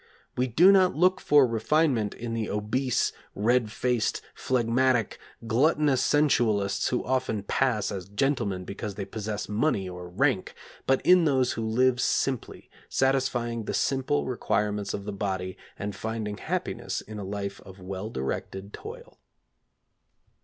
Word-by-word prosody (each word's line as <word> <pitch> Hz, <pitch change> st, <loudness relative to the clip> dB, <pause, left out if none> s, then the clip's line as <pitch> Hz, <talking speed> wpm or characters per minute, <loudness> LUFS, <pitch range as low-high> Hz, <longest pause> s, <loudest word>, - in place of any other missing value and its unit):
We 125 Hz, +1 st, +1 dB
do 170 Hz, -, +6 dB
not 190 Hz, -2 st, +4 dB
look 185 Hz, +4 st, +3 dB
for 145 Hz, -2 st, +5 dB
refinement 120 Hz, -1 st, +1 dB
in 115 Hz, -1 st, -5 dB
the 115 Hz, -2 st, -2 dB
obese, 110 Hz, +5 st, 0 dB, 0.2 s
red 115 Hz, +1 st, +2 dB
faced, 125 Hz, -1 st, 0 dB
phlegmatic, 125 Hz, -1 st, +1 dB, 0.3 s
gluttonous 140 Hz, +3 st, +3 dB
sensualists 110 Hz, -9 st, +2 dB
who 125 Hz, -, -1 dB
often 130 Hz, -5 st, -1 dB
pass 110 Hz, -2 st, 0 dB
as 95 Hz, -2 st, -6 dB
gentlemen 100 Hz, -5 st, -1 dB
because 100 Hz, +1 st, -6 dB
they 100 Hz, -1 st, -4 dB
possess 105 Hz, 0 st, -4 dB
money 105 Hz, -2 st, 0 dB
or 90 Hz, -1 st, -8 dB
rank, 90 Hz, -, 0 dB, 0.3 s
but 135 Hz, 0 st, +2 dB
in 180 Hz, -2 st, +6 dB
those 130 Hz, -4 st, +2 dB
who 115 Hz, -, -3 dB
live 120 Hz, +3 st, +2 dB
simply, 130 Hz, -1 st, -1 dB, 0.2 s
satisfying 125 Hz, -4 st, 0 dB
the -, -, -2 dB
simple 130 Hz, -, 0 dB
requirements 105 Hz, +4 st, -1 dB
of 100 Hz, -, -7 dB
the 105 Hz, -, -4 dB
body, 95 Hz, -2 st, -3 dB, 0.2 s
and 100 Hz, -1 st, -4 dB
finding 110 Hz, -1 st, -4 dB
happiness -, -, -3 dB
in 105 Hz, 0 st, -9 dB
a -, -, -5 dB
life 100 Hz, 0 st, -5 dB
of 95 Hz, 0 st, -13 dB
well 95 Hz, +3 st, -5 dB
directed 95 Hz, +6 st, -4 dB
toil. 480 Hz, +2 st, -10 dB
115 Hz, 140 wpm, -27 LUFS, 100-130 Hz, 0.3 s, do